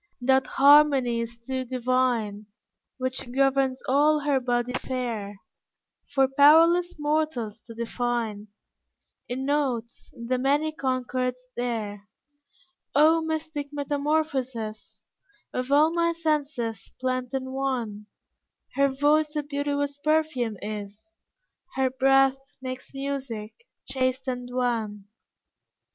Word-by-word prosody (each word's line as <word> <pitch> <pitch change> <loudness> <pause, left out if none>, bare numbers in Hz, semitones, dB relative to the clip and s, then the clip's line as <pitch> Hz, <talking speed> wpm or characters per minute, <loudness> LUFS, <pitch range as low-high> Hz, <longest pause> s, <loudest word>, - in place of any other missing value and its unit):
That 265 +1 +3
harmony 275 -4 +5
is 230 0 -6
too 260 +2 -4
divine, 245 -4 0 0.5
Which 255 -1 -3
governs 270 0 +1
all 295 +3 +4
her 285 -2 +2
body 245 0 -1
fair, 230 -7 -4 0.7
For 270 -2 +3
powerless 325 +6 +5
mortals 295 -8 -1
to 230 -1 -10
define 235 -2 -2 0.8
In 260 +2 -3
notes 265 -5 -2
the 245 +2 -2
many 290 +4 +1
concords 255 -3 -2 0.2
there. 215 -4 -3 0.9
O 315 +3 +5
mystic 315 -2 -3
metamorphosis 280 -6 -2 0.5
Of 255 +2 -3
all 305 +3 +5
my 335 0 +2
senses 290 -9 -2
blent 255 0 -2
in 260 0 -3
one! 245 -6 -3 0.7
Her 275 0 +3
voice 295 +3 +2
a 300 - 0
beauteous 285 0 -2
perfume 305 -8 0
is, 210 +1 -7 0.6
Her 265 -1 +1
breath 270 0 +2
makes 255 0 -7
music, 270 -6 -4 0.3
chaste 260 0 -1
and 250 -1 -3
wan. 230 -5 -1
260 Hz, 105 wpm, -26 LUFS, 240-285 Hz, 0.9 s, harmony